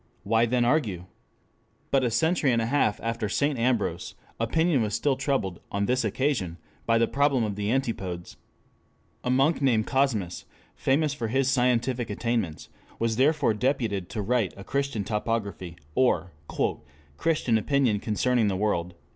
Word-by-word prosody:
Why 115 +3 +2
then 120 +1 +2
argue? 115 - 0 0.9
But 135 -1 +3
a 125 - +2
century 150 +4 +2
and 115 - +2
a 115 - 0
half 120 -4 +1
after 115 -2 -2
St. 140 +4 0
Ambrose, 115 -8 0 0.2
opinion 150 +5 +2
was 105 -2 -1
still 145 -2 +1
troubled, 115 - -1
on 100 0 0
this 125 +3 +1
occasion 110 - -1 0.3
by 115 0 +4
the 115 0 +3
problem 140 -3 +2
of 105 -2 -2
the 105 0 -2
antipodes. 95 -9 -3 0.9
A - - -2
monk 135 +5 +2
named 115 -6 +3
Cosmas, 120 -10 0 0.3
famous 145 +2 +1
for 120 -5 -3
his 135 +3 +1
scientific 125 -2 +1
attainments, 105 -6 -2 0.3
was 115 -1 0
therefore 145 -2 +3
deputed 110 -6 -1
to 105 -3 -3
write 115 -2 0
a 95 - -8
Christian 140 -2 -2
Topography, 105 -5 -3 0.2
or 125 -6 +2 0.9
"Christian 155 -9 +1
Opinion 125 -2 +1
concerning 115 +2 +1
the 95 -2 0
World." 90 -4 -1
115 Hz, 150 wpm, -26 LUFS, 105-135 Hz, 0.9 s, by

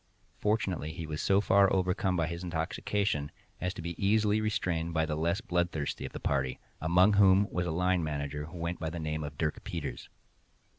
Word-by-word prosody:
Fortunately 95 -7 0
he 80 0 -6
was 75 -1 -4
so 100 0 +4
far 100 -1 +4
overcome 95 0 +1
by 85 -3 +1
intoxication 85 -1 -1 0.3
as 90 - -1
to - - -7
be 85 0 -3
easily 105 +1 +3
restrained 85 -6 -1
by 80 0 +3
the 75 -1 -2
less 85 +6 0
bloodthirsty 85 -6 -1
of - - -11
the - - -6
party, 65 -2 0 0.2
among 90 +5 +5
whom 100 0 +6
was 90 0 -1
a - - -1
line 90 +1 +1
manager, 75 -1 -3
who 85 +3 -10
went 85 +1 -3
by 80 - -2
the 85 - -6
name 75 -1 -2
of 70 -1 -7
Dirk 75 -2 -2
Peters. 80 -5 -5
85 Hz, 190 wpm, -30 LUFS, 80-95 Hz, 0.3 s, whom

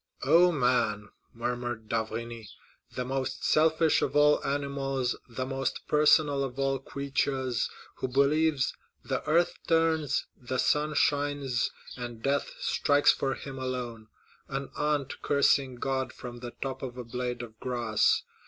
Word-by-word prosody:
"Oh, 175 +2 +6
man!" 125 -7 +1 0.2
murmured 120 -1 -4
d'Avrigny, 115 0 -3 0.5
"the 125 - -2
most 135 0 -3
selfish 160 0 +3
of - - -1
all 150 0 +5
animals, 135 -2 -1
the 130 +2 -3
most 135 0 -2
personal 150 -2 +4
of 130 -1 -5
all 135 0 +1
creatures, 135 -2 -1 0.3
who - - -2
believes 140 +2 +2 0.3
the - - -1
earth 170 +3 +2
turns, 160 -3 +2
the 130 +1 -4
sun 150 +3 +1
shines, 145 -5 +1 0.3
and 120 -2 -7
death 140 +1 0
strikes 145 0 +3
for 135 -1 -1
him 135 -1 -8
alone,—an 125 +2 -6
ant 150 -2 -1
cursing 140 -2 +3
God 130 +1 -2
from 120 -1 -8
the 120 0 -6
top 130 -1 -4
of 125 -2 -6
a 125 - -4
blade 125 +1 -4
of 110 -1 -11
grass! 120 -4 +1
135 Hz, 135 wpm, -29 LUFS, 125-145 Hz, 0.5 s, Oh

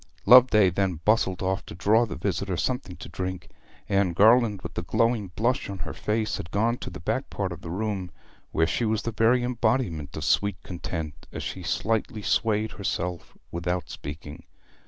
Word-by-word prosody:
Loveday 115 -6 +7
then 90 -2 0
bustled 100 -4 +2
off 95 +1 0
to - - -8
draw 110 +6 +3
the - - -5
visitor 95 -1 -2
something 95 -3 -2
to - - -9
drink. 95 0 -5 0.4
Anne 100 -3 +2
Garland, 110 0 +4
with 85 -1 -7
a - - -2
glowing 115 +4 +1
blush 120 +3 0
on 100 - -5
her 80 - -5
face, 110 0 -1
had 80 - -7
gone 115 +5 +1
to - - -6
the 95 - -9
back 110 +10 -2
part 95 -3 -3
of 85 -1 -7
the 85 - -7
room, 95 0 -2 0.4
where 80 - +2
she 100 - -1
was 110 0 0
the 115 - -2
very 115 +3 +3
embodiment 115 - -1
of 75 - -4
sweet 100 +3 +2
content 80 -4 -6
as - - -5
she - - -5
slightly 110 0 -1
swayed 110 +2 +1
herself 90 -4 -4
without 90 +1 -2
speaking. 75 +3 -8
100 Hz, 180 wpm, -26 LUFS, 85-110 Hz, 0.4 s, Loveday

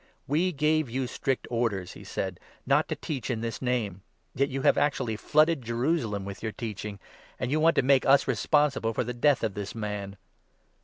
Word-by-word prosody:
" - - -41
We 165 +6 +2
gave 155 -2 +1
you 130 +2 -1
strict 135 +1 -2
orders," 115 -6 -1
he - - -11
said, 95 -2 -4
" - - -31
not - - +3
to - - -2
teach 135 -6 -4
in 115 -3 -1
this 115 0 -3
28 125 -1 0
Name. 100 -6 -3 0.3
Yet 140 +2 +1
you 135 0 -3
have - - +5
actually 130 -6 0
flooded 155 +6 +3
Jerusalem 115 - -1
with 100 0 -7
your 110 -1 -3
teaching, 105 -3 -5 0.4
and 125 0 -2
you 155 - +2
wajit 165 +1 +5
to - - +4
make 135 0 +4
us 135 +1 +5
responsible 135 -1 +2
for - - +1
the 125 +1 -4
death 135 +2 +2
of 110 -3 0
this 100 +1 -5
man." 105 -2 -4
125 Hz, 210 wpm, -28 LUFS, 105-140 Hz, 0.4 s, have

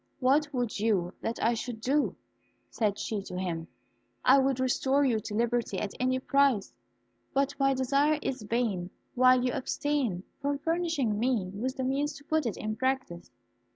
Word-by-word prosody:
"What 285 +3 +3
would 245 -6 -2
you 200 -5 +1
that 225 0 -2
I 230 - +3
should 235 0 -4
do?" 280 +6 +1 0.6
said 210 -3 0
she 215 -3 -3
to 180 -2 -7
him. 170 -3 -3 0.6
"I 270 +2 +7
would 265 -1 +1
restore 265 +2 +2
you 235 -5 +2
to 210 0 -6
liberty 235 -3 0
at 200 +1 -3
any 255 0 +1
price; 270 -5 +2 0.6
but 275 +1 +2
my 275 0 +3
desire 280 +4 +2
is 260 -3 -2
vain 210 -5 -1 0.2
while 255 0 +5
you 250 - 0
abstain 265 -8 -1 0.2
from 285 0 0
furnishing 325 -8 0
me 230 -6 0
with 255 +6 -3
the 260 - -1
means 280 +3 0
to 285 0 -12
put 315 -2 0
it 215 - -3
in 215 0 -3
practice." 260 -10 -2
255 Hz, 170 wpm, -29 LUFS, 215-275 Hz, 0.6 s, I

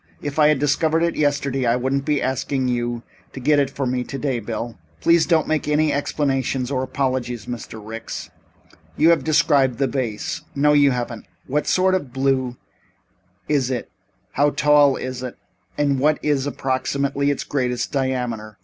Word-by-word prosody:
If 145 +1 -4
I 150 - +6
had 150 -1 +4
discovered 155 +4 +1
it 170 - 0
yesterday 140 -3 0
I 115 - +3
wouldn't 135 +2 -1
be 150 -2 +1
asking 130 0 -1
you 120 -1 -2 0.3
to - - -7
get 145 +3 +3
it 140 -2 +1
for 135 0 -3
me 125 0 -1
today, 135 -1 -2
Bill." 115 +1 -5 0.2
"Please 170 - +4
do 170 - +4
not 160 - +1
make 155 -1 0
any 150 0 +2
explanations 135 -3 -1
or 130 -2 0
apologies, 130 -4 -2
Mr. 115 -2 -7
Ricks. 110 +2 -7 0.7
You 160 +2 +5
have 170 - +2
described 140 -5 +3
the 135 - +2
vase 125 -6 -3
no 150 +1 +4
you 145 -1 +5
haven't. 120 -3 -4 0.2
What 150 +3 -1
sort 185 0 +3
of 145 -9 -1
blue 130 -1 0 0.9
is 140 -4 +1
it, 125 -3 -3 0.4
how 145 +1 +3
tall 145 -2 +4
is 130 -1 -5
it 125 -2 -6 0.4
and 140 -2 +1
what 150 +3 +3
is, 145 -2 +1
approximately, 140 +1 -1
its 140 - -1
greatest 125 -3 -2
diameter? 125 -6 -2
135 Hz, 170 wpm, -22 LUFS, 125-145 Hz, 0.9 s, I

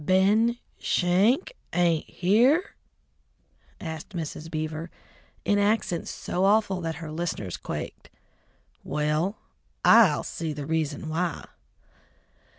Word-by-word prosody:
"Ben 205 +7 +3 0.2
Schenk 205 - +2 0.2
ain't 170 -3 +2
here?" 245 - +3 1.1
asked 160 +3 -7
Mrs. 160 -1 -5
Beaver 155 +1 -4 0.6
in 205 0 +3
accents 205 -4 +1
so 180 - -2
awful 200 -2 +3
that 165 -1 -3
her 165 -3 -7
listeners 155 - -3
quaked. - - -6 0.7
"Well, 150 +6 0 0.5
I'll 215 -10 +6
see 160 -2 -4
the 145 -1 -5
reason 155 -1 -2
why!" 165 +1 -2
175 Hz, 100 wpm, -26 LUFS, 155-205 Hz, 1.1 s, I'll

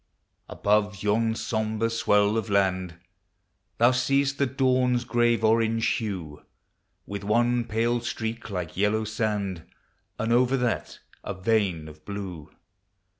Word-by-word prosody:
Above 105 -1 0
yon 110 +2 +1
sombre 110 0 -1
swell 105 -2 +2
of 110 -3 -2
land 95 -3 +1 0.8
Thou 120 +2 +5
seest 135 +2 +1
the 140 - +3
dawn's 125 -1 +2
grave 120 -1 +2
orange 115 0 +2
hue, 95 -10 -5 0.6
With 100 0 -6
one 120 +3 +2
pale 115 +2 0
streak 115 0 -4
like 90 -5 -4
yellow 105 +3 +1
sand, 105 -4 -2 0.6
And 115 +1 0
over 125 +2 +3
that 125 -2 -2 0.2
a - - -4
vein 95 -5 0
of 75 0 -13
blue. 95 -7 -7
110 Hz, 125 wpm, -26 LUFS, 100-120 Hz, 0.8 s, Thou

